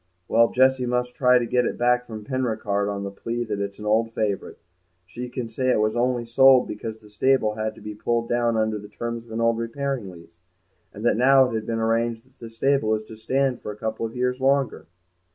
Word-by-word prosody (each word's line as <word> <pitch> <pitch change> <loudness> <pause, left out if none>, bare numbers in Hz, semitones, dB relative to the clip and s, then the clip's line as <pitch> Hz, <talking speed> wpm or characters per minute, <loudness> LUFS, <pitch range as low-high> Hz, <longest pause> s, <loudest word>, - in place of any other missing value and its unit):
"Well, 115 +1 +4
Jessie 130 0 +3
must 125 0 -1
try 125 -1 +4
and 120 -1 -1
get 125 +1 +2
it - - -4
back 125 0 +2
from 110 -2 -8
Penricarde 110 -5 -1
on 100 -1 -3
the 100 - -5
plea 115 +4 -4
that 105 -3 -4
it's 100 0 -4
an 105 - -9
old 115 +2 +2
favourite. 105 -4 -2 0.5
She 120 +7 -7
can 125 -1 -4
say 130 +3 -2
it 125 - +3
was 110 +1 +1
only 120 0 0
sold 130 +2 +5
because 110 +1 -6
the 110 -1 -18
stable 110 +1 +2
had 110 0 -3
to - - -15
be 105 - -6
pulled 115 +2 -1
down 120 -1 +1
under 110 -1 0
the 105 0 -11
terms 115 +2 -5
of - - -14
an 110 - -3
old 115 0 +2
repairing 120 -2 -3
lease, 85 -1 -15 0.5
and 105 +3 -8
that 120 - +3
now 130 +1 +5
it - - -6
has 110 -1 -2
been 115 - -2
arranged 115 +1 0
that 130 +1 -30
the 115 - -8
stable 115 -1 +1
is 110 - -5
to 110 - -12
stand 130 +3 0
for - - -5
a 105 - -10
couple 110 +1 -4
of 115 +1 -4
years 125 +1 -1
longer." 135 -1 +1
115 Hz, 235 wpm, -24 LUFS, 110-125 Hz, 0.5 s, sold